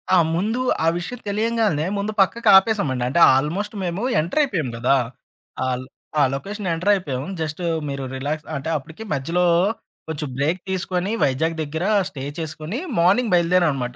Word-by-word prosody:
ఆ! - - +6 0.2
ముందు 215 +8 0 0.3
ఆ - - +3
విషయం 200 +8 -5
తెలియంగానే 215 -6 +1
ముందు 200 +2 -2
పక్కకి 225 +4 +2
ఆపేసామండి. 190 - +1
అంటే 135 +7 +1 0.2
ఆల్మోస్ట్ 180 +11 -1
మేము 180 +4 -2 0.2
ఎంటర్ 175 - 0
అయిపోయాం 180 - -1
కదా! 125 +3 +3 0.7
ఆ - - 0
ల్ - - -9 0.3
ఆ - - +5
లొకేషన్ 200 +8 -5
ఎంటర్ 180 +5 +1
అయిపోయాం. 140 -10 -2 0.2
జస్టు 160 +2 -4 0.3
మీరు 140 -1 -4
రిలాక్స్ 145 +4 -4
అంటే 140 +3 -4
అప్పటికి 160 +8 -6
మధ్యలో 165 +6 0 0.6
కొంచెం 155 -1 -4
బ్రేక్ 155 +6 0
తీసుకొని 185 +1 -1
వైజాగ్ 160 +5 +1
దగ్గర 160 +4 -3 0.2
స్టే 135 -7 -8 0.2
చేసుకొని 160 +5 -5 0.2
మార్నింగ్ 200 +7 +3
బయలుదేరాం 175 0 +4
అనమాట. 125 -2 -4
170 Hz, 155 wpm, -22 LUFS, 145-200 Hz, 0.7 s, ఆ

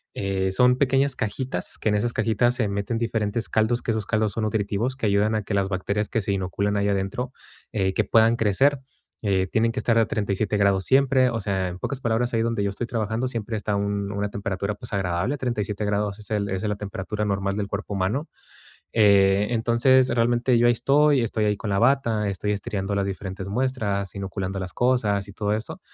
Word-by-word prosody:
eh, 95 -1 -1
son 125 +5 +4
pequeñas 135 0 +2
cajitas, 110 -3 -3
que - - -4
en 105 - +2
esas 115 +3 0
cajitas 120 +2 +1
se 115 -4 0
meten 100 +3 -2
diferentes 115 -1 -1
caldos, 110 +2 +1
que 115 - 0
esos 110 -2 -1
caldos 110 -2 +1
son 110 - -2
nutritivos, 110 +4 -1
que 115 - -2
ayudan 105 +2 +2
a 105 - -1
que 100 - -5
las 100 -1 +1
bacterias 100 +3 -1
que 115 - 0
se 100 -1 -2
inoculan 100 +2 -1
ahí 100 0 +1
adentro, 100 +6 -2 0.4
eh, 95 -3 0
que 110 - +1
puedan 115 +2 +4
crecer, 130 +7 +2 0.4
eh, 95 -3 +1
tienen 115 +4 +1
que 130 - -2
estar 115 -1 +2
a 115 - +4
37 105 0 -1
grados 100 -2 +2
siempre. 130 -1 +4
O 115 -2 -2
sea, 95 -2 -1
en 90 0 -6
pocas 135 +6 -4
palabras, 120 0 0
ahí 115 - +2
donde 115 -3 0
yo 100 - +1
estoy 115 +4 -4
trabajando 110 +2 -1
siempre 115 -2 -3
está 105 0 -2
un 100 0 -2
una 100 0 -2
temperatura, 100 0 -3
pues, 115 +1 -8
agradable. 95 +8 -1
37 105 -5 -2
grados 105 0 -1
es 105 - -10
el 100 -1 0
esa 95 +2 -2
es - - -1
la 105 - -2
temperatura 105 +1 -4
normal 100 -1 -1
del 100 -1 -2
cuerpo 100 +1 -4
humano. 105 - -1 0.6
Eh, 100 -2 +4
entonces, 120 +3 +3
realmente 120 +1 +2
yo 120 - +4
ahí 120 - +6
estoy, 140 +2 +3
estoy 110 -1 0
ahí 105 -1 +1
con 105 0 -5
la 100 - +1
bata, 115 -5 +2
estoy 100 +2 -2
estiriando 100 -1 -3
las 100 -1 0
diferentes 95 0 -5
muestras, 105 -5 -1
inoculando 95 0 -4
las 90 -1 -6
cosas 110 -6 +1
y 100 - -11
todo 105 +1 -1
eso. 110 - -5
105 Hz, 210 wpm, -24 LUFS, 100-120 Hz, 0.6 s, ahí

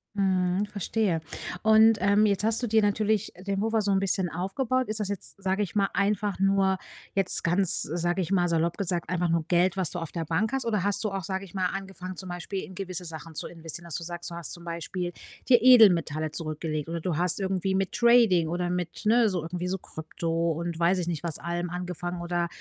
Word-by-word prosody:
Mhm, 190 0 +1
verstehe 200 -3 -1 0.4
und, 220 0 +6
ähm, 200 +2 +4
jetzt 200 0 +1
hast 225 +2 +2
du 240 - -1
dir 220 0 +3
natürlich 210 0 +1 0.2
den 195 0 0
Puffer 220 +1 +1
so 200 - 0
'n 195 - +3
bisschen 190 -2 0
aufgebaut. 245 +8 -1
Ist 215 0 -2
das 205 - -1
jetzt, 200 0 -6
sage 195 +2 0
ich 180 - -6
mal 200 -1 +2
einfach 200 0 0
nur 195 -1 +3 0.4
jetzt 195 -2 +2
ganz, 180 +1 +2
sage 175 +3 -1
ich 180 - -4
mal, 180 -2 +3
salopp 170 0 0
gesagt, 175 -4 -2
einfach 175 -1 0
nur 165 -1 +1
Geld, 180 +1 +3
was 185 -4 0
du - - -6
auf 165 -3 -4
der 165 -2 -3
Bank 180 +8 0
hast? 265 -3 -1
Oder 210 -4 0
hast 205 +1 0
du 215 - 0
auch, 195 -2 -4
sage 190 0 -3
ich 190 - -15
mal, 185 -1 0
angefangen, 190 -1 -6
zum 185 0 -7
Beispiel 175 +2 -4
in 185 - -10
gewisse 185 -2 -5
Sachen 160 0 -8
zu - - -3
investieren, 165 0 -8
dass 165 - -5
du 170 - -3
sagst, 175 +1 -5
du 170 - -7
hast 170 -2 -5
zum 175 - -10
Beispiel 175 +1 -4 0.4
dir 245 -2 +7
Edelmetalle 175 - +6
zurückgelegt 155 -1 -4
oder 165 -1 -3
du 165 -4 -1
hast 180 +2 +2
irgendwie 190 0 -1
mit 190 0 0
Trading 230 -9 +4
oder 175 +1 -1
mit, 180 +3 -4
ne, 230 0 +4
so 180 -3 -2
irgendwie 175 +3 -4
so 190 0 -2
Krypto 165 +1 -3
und 170 +1 -3
weiß 180 +2 +3
ich 175 - -3
nicht, 170 -2 -3
allem 170 +2 -3
angefangen 175 0 -4
oder 175 0 -1
185 Hz, 225 wpm, -27 LUFS, 170-200 Hz, 0.4 s, dir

